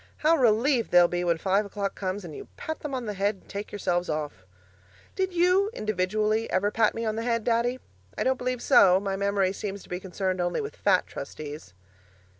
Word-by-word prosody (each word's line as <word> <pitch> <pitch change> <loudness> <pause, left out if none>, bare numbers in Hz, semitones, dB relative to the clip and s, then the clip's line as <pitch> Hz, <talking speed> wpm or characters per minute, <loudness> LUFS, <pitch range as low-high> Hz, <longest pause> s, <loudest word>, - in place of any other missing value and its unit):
How 325 +2 +6
relieved 245 -1 +2
they'll 175 -1 +6
be 175 0 -2
when 170 -1 +1
five 195 +4 +1
o'clock 200 -1 -3
comes 190 0 -4
and 155 -4 -8
you - - -9
pat 315 - -5
them 290 -3 -4
on 250 -2 -4
the 210 - -3
head 200 +1 0
and 190 - -23
take 200 +1 -6
yourselves 180 -3 -1
off! 150 -12 -4 0.7
Did 380 -1 0
you 360 +3 +3
(individually) 215 +2 0
ever 200 +2 +1
pat 220 -1 +2
me 230 0 -3
on 215 0 -1
the 225 - -2
head, 230 -1 0
Daddy? 240 +2 +1 0.4
I - - 0
don't 260 -1 +1
believe 250 -1 -2
so 185 -1 +6
my 195 -1 -2
memory 200 -1 +1
seems 200 0 -5
to - - -18
be 180 - -3
concerned 185 0 -2
only 175 0 -1
with 430 - -5
fat - - +2
Trustees. 145 -12 -8
205 Hz, 210 wpm, -27 LUFS, 185-235 Hz, 0.7 s, How